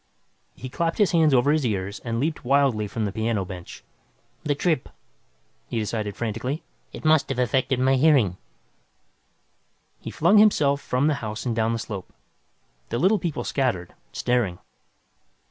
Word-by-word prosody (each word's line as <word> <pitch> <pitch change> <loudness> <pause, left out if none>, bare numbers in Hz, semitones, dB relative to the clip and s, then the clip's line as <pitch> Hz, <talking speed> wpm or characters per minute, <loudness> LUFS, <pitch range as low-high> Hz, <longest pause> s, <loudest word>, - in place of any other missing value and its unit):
He 130 - -8
clapped 165 +6 -2
his 205 -3 +3
hands 160 -3 +4
over 130 +2 +4
his 155 -1 +1
ears 100 -3 -2
and 115 -1 -3
leaped 155 +3 -2
wildly 130 -5 +2
from 110 +1 -3
the 100 - -2
piano 110 -2 -1
bench. 90 -1 -9 0.6
The 150 -2 -1
trip, 155 -1 0 0.8
he - - -4
decided 105 -2 -2
frantically. 120 +6 -3 0.3
It - - -10
must 155 -2 +4
have 135 - -2
affected 125 +1 +1
my 130 +1 +3
hearing. 130 - +3 1.6
He - - -7
flung 180 +7 +4
himself 145 -10 +4
from 125 +3 0
the 155 - +3
house 110 +1 -5
and 120 -2 -1
down 110 0 +1
the - - -1
slope. 100 -4 -7 0.8
The 120 - -2
Little 195 - +3
People 170 -4 -3
scattered, 120 -11 -1 0.2
staring. 120 -8 0
125 Hz, 155 wpm, -24 LUFS, 110-150 Hz, 1.6 s, hands